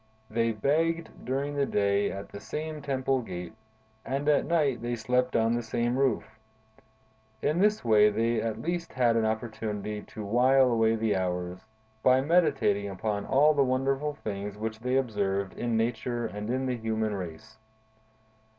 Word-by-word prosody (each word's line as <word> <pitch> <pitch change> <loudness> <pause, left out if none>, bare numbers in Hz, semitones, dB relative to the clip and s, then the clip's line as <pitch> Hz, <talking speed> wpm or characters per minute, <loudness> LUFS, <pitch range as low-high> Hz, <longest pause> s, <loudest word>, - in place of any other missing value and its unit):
They 115 +1 +1
begged 165 +9 -1
during 140 +3 -1
the 140 -1 0
day 100 0 +1
at 100 +1 -7
the 100 - -8
same 155 +7 -5
temple 135 -2 0
gate, 90 -4 -7 0.5
and 135 +3 -3
at 150 -1 +3
night 145 -8 +1
they 120 0 -2
slept 125 +3 0
on 115 0 +3
the 120 - 0
same 120 +1 -1
roof. 130 -4 0 1.0
In 155 +4 +1
this 210 - +2
way 105 -2 +6
they 115 +2 0
at 110 -1 -3
least 170 0 -3
had 120 -3 +3
an 115 -1 +2
opportunity 110 -2 -3
to 105 +1 -8
while 125 +4 +4
away 115 -1 +3
the 110 -1 0
hours, 90 -1 -2 0.4
by 130 +2 +5
meditating 135 - +2
upon 100 +2 -3
all 145 +3 +5
the 140 -2 +3
wonderful 135 +3 0
things 100 -4 -5
which 110 +1 -4
they 125 +2 -1
observed 100 -6 -1
in 120 -2 -1
Nature 120 +1 -1
and 105 0 -5
in 130 +2 0
the 125 -1 -1
human 110 -1 -1
race. 100 +4 -7
115 Hz, 160 wpm, -28 LUFS, 105-135 Hz, 1.0 s, way